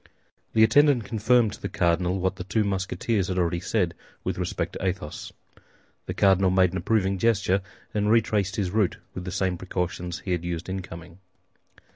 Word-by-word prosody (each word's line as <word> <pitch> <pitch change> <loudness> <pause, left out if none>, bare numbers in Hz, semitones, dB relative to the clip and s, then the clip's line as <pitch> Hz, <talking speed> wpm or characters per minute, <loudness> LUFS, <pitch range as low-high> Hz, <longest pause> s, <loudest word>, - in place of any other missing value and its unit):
The 110 - +5
attendant 135 +2 +5
confirmed 110 +1 +2
to - - -11
the - - -3
cardinal 90 +1 +1
what 95 +1 -1
the - - -5
two 105 +4 0
Musketeers 100 +1 -1
had 95 - -2
already 85 -1 +1
said 90 -2 0 0.3
with - - -2
respect - - -2
to - - -6
Athos. 90 -5 -3 0.8
The - - -4
cardinal 95 -1 +4
made 95 -1 +3
an 95 - -3
approving 95 +1 +1
gesture, 100 -3 +2 0.3
and 105 0 +1
retraced 105 -3 +2
his 95 -4 -1
route 105 -3 +1 0.2
with 90 - -6
the 90 - -4
same 90 -1 -1
precautions 90 -1 -3
he 95 - -4
had 90 -1 0
used 85 0 -4
in 95 0 -2
coming. 85 0 -11
95 Hz, 180 wpm, -26 LUFS, 90-105 Hz, 0.8 s, The